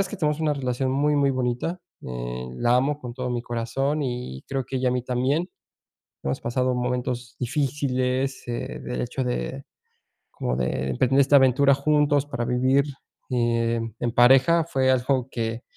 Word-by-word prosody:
es 195 - 0
que 210 - -6
tenemos 150 -4 0
una 155 -2 +1
relación 130 -1 -1
muy, 145 +2 +2
muy 140 -1 +3
bonita, 130 +7 -2 0.2
eh, 60 0 -5
la 120 - +2
amo 145 +3 0
con 120 -3 -6
todo 125 0 -4
mi 120 -1 -2
corazón 125 +6 -1
y 120 - -5
creo 135 -2 -2
que 135 +1 -4
ella 130 0 +1
a - - 0
mí 125 - -1
también. 130 +8 0 0.7
Hemos 70 - -2
pasado 125 +1 0
momentos 125 0 -2
difíciles, 130 -1 -1
eh, 120 -1 -4
de 125 - -4
hecho 125 +2 -3
de 130 +2 -3 0.7
como 60 0 -2
de 65 +1 -1
emprender 130 - +2
esta 140 +1 +5
aventura 135 +1 +5
juntos 145 0 +2
para 120 -4 -3
vivir, 130 +3 +2 0.5
eh, 115 -1 +1 0.2
en 120 - -1
pareja. 135 +8 +5
Fue 135 -5 +1
algo 130 0 +1
que 115 -1 -3
130 Hz, 165 wpm, -24 LUFS, 120-140 Hz, 0.7 s, esta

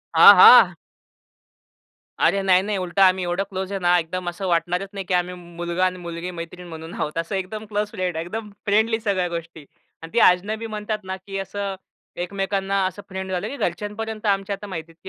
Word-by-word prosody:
हां, - - +10
हां. - - +8 1.5
अरे 200 - +3
नाही, 185 -1 +4
नाही, 205 +1 -2
उलटं 185 +1 -1
आम्ही 185 -1 +5
एवढं 175 +2 -1
क्लोज 190 -1 -4
आहे 195 - -2
ना, 175 -1 +3
एकदम 175 +2 -4
असं 175 +3 -6
वाटणारच 180 +3 0
नाही 195 -1 -5
की 185 - -2
आम्ही 180 0 0
मुलगा 175 +1 -3
आणि 185 0 -1
मुलगी 170 +1 -6
मैत्रीण 175 +1 -8
म्हणून 160 0 -9
आहोत, 150 +2 -4
असं 165 +4 -2
एकदम 195 +3 -4
क्लोज 210 0 -2
फ्रेंड 180 -2 -3
आहे. 160 - -2
एकदम 215 +4 -6 0.2
फ्रेंडली 220 +2 +2
सगळ्या 200 -5 0
गोष्टी 165 -2 -7 0.4
आणि 165 - -10
ती - - +3
अजनबी 210 +5 -1
म्हणतात 215 -1 -4
ना, 190 0 -4
की 195 +1 -7
असं 200 0 -4 0.5
एकमेकांना 195 0 -1
असं 190 +2 -7
फ्रेंड 190 0 -5
झालं 180 -1 -2
की 285 - -6
घरच्यांपर्यंत 210 +4 -4
आमच्या 200 -1 0
आता 205 +1 -10
माहिती 165 -4 -7
आहे 165 - -25
185 Hz, 195 wpm, -22 LUFS, 175-200 Hz, 1.5 s, हां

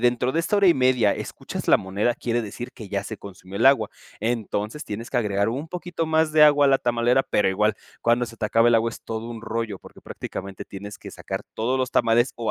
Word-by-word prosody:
dentro 125 +1 +2
de 165 - +1
esta 205 +5 0
1:30, 130 - +4
escuchas - - -6
la - - +7
moneda, 100 +5 -1
quiere 120 -1 -1
decir 115 +2 -7
que 110 -5 -10
ya 100 0 -2
se 110 0 -7
consumió 95 0 -10
el - - +3
agua. 135 -6 +4 0.3
Entonces, 110 +3 -2
tienes 110 +3 -6
que 125 - +1
agregar 100 -1 +1
un 140 +7 -4
poquito 175 -2 -4
más 160 0 +2
de 155 - +6
agua 145 -1 +5
a 140 - +5
la 135 - +4
tamalera. 120 +2 +2
Pero 105 - +1
igual, 105 +2 +2 0.3
cuando 120 +1 +2
se 115 0 -10
te 105 - 0
acaba 115 +2 +4
el 120 - +4
agua 115 0 +3
es - - -11
todo 115 +1 -5
un 115 -1 -7
rollo, 110 -3 -3
porque - - -15
prácticamente 95 0 -7
tienes 100 +1 -9
que - - -10
sacar - - -6
todos 125 +4 0
los 130 0 -1
tamales, 120 +2 +3
o 115 -2 -2
115 Hz, 230 wpm, -24 LUFS, 105-130 Hz, 0.3 s, la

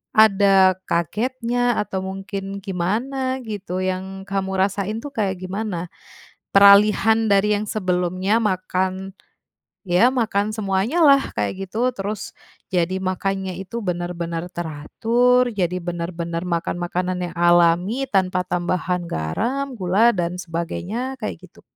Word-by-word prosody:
ada 195 -3 +5
kagetnya, 240 - 0
atau 190 -2 -3
mungkin 195 +1 -5
gimana 255 +9 -2
gitu, 185 -3 -4
yang 190 +1 -5
kamu 195 -1 -1
rasain 200 +2 -1
tuh 290 - -5
kayak 190 -3 0
gimana? 185 -2 -4 0.6
Peralihan 210 +3 +6
dari 200 +1 +4
yang 205 - -2
sebelumnya, 185 +2 0
makan, 185 -1 -1 0.8
ya 180 +8 +5
makan 215 -5 0
semuanyalah, 230 - +3
kayak 105 - -3
gitu, 235 +6 0
terus 200 -1 -5 0.4
jadi 180 +1 +1
makannya 190 0 -2
itu 215 +5 -5
benar-benar 175 -1 -3
teratur, 230 +10 +1
jadi 180 -3 -1
benar-benar 170 0 -4
makan 170 -2 -2
makanan 180 +1 -2
yang 175 - -5
alami 175 +7 +3
tanpa 185 -2 +2
tambahan 180 0 -1
garam, 245 - -2
gula, 195 +6 +4
dan 175 -2 -2
sebagainya 180 +9 -4
kayak - - -4
gitu. - - -21
190 Hz, 115 wpm, -22 LUFS, 180-215 Hz, 0.8 s, Peralihan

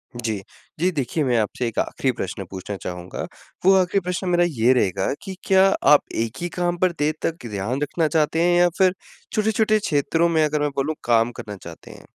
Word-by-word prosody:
जी। 110 -5 -3 0.4
जी, 185 +2 +2
देखिए, 150 +1 -1
मैं 125 -3 +2
आपसे 115 +3 -1
एक 115 - -3
आखिरी 130 - 0
प्रश्न 95 -3 -5
पूछना 95 +2 -6
चाहूँगा। 90 -1 -6 0.4
वो 195 - +7
आखिरी 185 +1 +2
प्रश्न 180 +1 -3
मेरा 175 0 +3
ये 125 -4 +3
रहेगा 95 -5 +1 0.2
कि 190 -2 -6
क्या 190 0 +6 0.3
आप 145 - +6
एक 115 -1 -2
ही 175 - -2
काम 175 0 0
पर 185 0 +2
देर 150 +1 +2
तक 165 -5 -3
ध्यान 105 +7 -3
रखना 155 +2 0
चाहते 160 +1 +1
हैं? 175 0 +3
या 175 - +5
फिर 185 -2 +4 0.4
छोटे-छोटे 215 0 +2
क्षेत्रों 165 0 +1
में, 160 -2 +3
अगर 150 0 -1
मैं 145 - +1
बोलूँ 140 +3 -1
काम 115 0 +3
करना 105 -1 -7
चाहते 85 -1 -11
हैं? - - -14
150 Hz, 200 wpm, -22 LUFS, 115-175 Hz, 0.4 s, वो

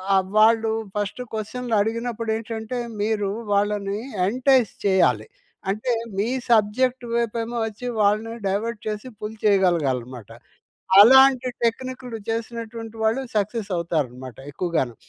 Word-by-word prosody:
ఆ! - - +6 0.2
వాళ్ళు 225 0 +4 0.3
ఫస్ట్ 205 +4 -3
క్వశ్చన్‌లు 230 +2 -3
అడిగినప్పుడు 230 +1 -3
ఏంటంటే, 225 +1 -5 0.3
మీరు 210 -2 0 0.3
వాళ్ళని 205 0 0 0.3
ఎంటైస్ 255 -1 +3
చేయాలి. 125 - +3 0.4
అంటే 215 +6 -1 0.3
మీ 205 +3 +1 0.2
సబ్జెక్ట్ 240 +4 +2
వైపు 235 -1 0
ఏమో 235 +1 -5
వచ్చి, 220 +3 -8 0.2
వాళ్ళని 215 +3 +1
డైవర్ట్ 210 +3 -2
చేసి 215 +3 -4
పుల్ 215 +1 -6
చేయగలగాలన్నమాట. 135 - +1 0.7
అలాంటి 260 +3 +7 0.2
టెక్నిక్‌‌లు 250 0 -2
చేసినటువంటి 225 0 -5
వాళ్ళు 225 +4 +2 0.2
సక్సెస్ 210 0 -1
అవుతారన్నమాట 130 -8 -3
ఎక్కువగాను. 150 -6 -1
220 Hz, 110 wpm, -23 LUFS, 200-235 Hz, 0.7 s, అలాంటి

